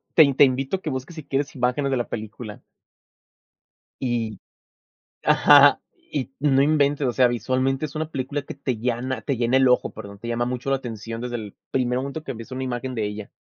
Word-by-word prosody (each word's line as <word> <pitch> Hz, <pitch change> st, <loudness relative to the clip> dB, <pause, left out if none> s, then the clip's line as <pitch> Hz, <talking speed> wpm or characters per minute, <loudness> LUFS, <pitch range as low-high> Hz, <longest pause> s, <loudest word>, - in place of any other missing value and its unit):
te 145 Hz, -4 st, +7 dB
te 135 Hz, -, +6 dB
invito 135 Hz, +7 st, +1 dB
que 155 Hz, -, -3 dB
busques 130 Hz, +4 st, -5 dB
si 155 Hz, -, -7 dB
quieres 140 Hz, +1 st, -2 dB
imágenes 130 Hz, +2 st, 0 dB
de 135 Hz, -, +1 dB
la 120 Hz, -, -3 dB
película. 110 Hz, 0 st, -7 dB, 1.4 s
Y 115 Hz, -5 st, -2 dB, 0.8 s
ajá, -, -, +7 dB, 0.3 s
y 135 Hz, -3 st, -3 dB
no 135 Hz, -1 st, +3 dB
inventes, 145 Hz, -1 st, +2 dB
o 120 Hz, -, 0 dB
sea, 125 Hz, 0 st, +5 dB
visualmente 130 Hz, +4 st, 0 dB
es 150 Hz, -, -9 dB
una 155 Hz, 0 st, -2 dB
película 140 Hz, 0 st, -3 dB
que -, -, -7 dB
te 135 Hz, -4 st, -3 dB
llana, 125 Hz, +3 st, -2 dB
te 140 Hz, -4 st, -2 dB
llena 120 Hz, +2 st, +2 dB
el 130 Hz, 0 st, +5 dB
ojo, 125 Hz, -, +3 dB
perdón, 100 Hz, -2 st, -10 dB
te 115 Hz, -, -7 dB
llama 120 Hz, +1 st, 0 dB
mucho 125 Hz, +2 st, -3 dB
la 135 Hz, -, +2 dB
atención 115 Hz, -2 st, -6 dB
desde 120 Hz, 0 st, -4 dB
el 105 Hz, -4 st, -6 dB, 0.2 s
primer 125 Hz, -1 st, +1 dB
momento 140 Hz, +4 st, -5 dB
que 135 Hz, -, -5 dB
ves 115 Hz, +1 st, -10 dB
una 130 Hz, +1 st, -3 dB
imagen 125 Hz, 0 st, -3 dB
de 110 Hz, -2 st, -1 dB
ella. 105 Hz, 0 st, -6 dB
130 Hz, 200 wpm, -24 LUFS, 120-140 Hz, 1.4 s, te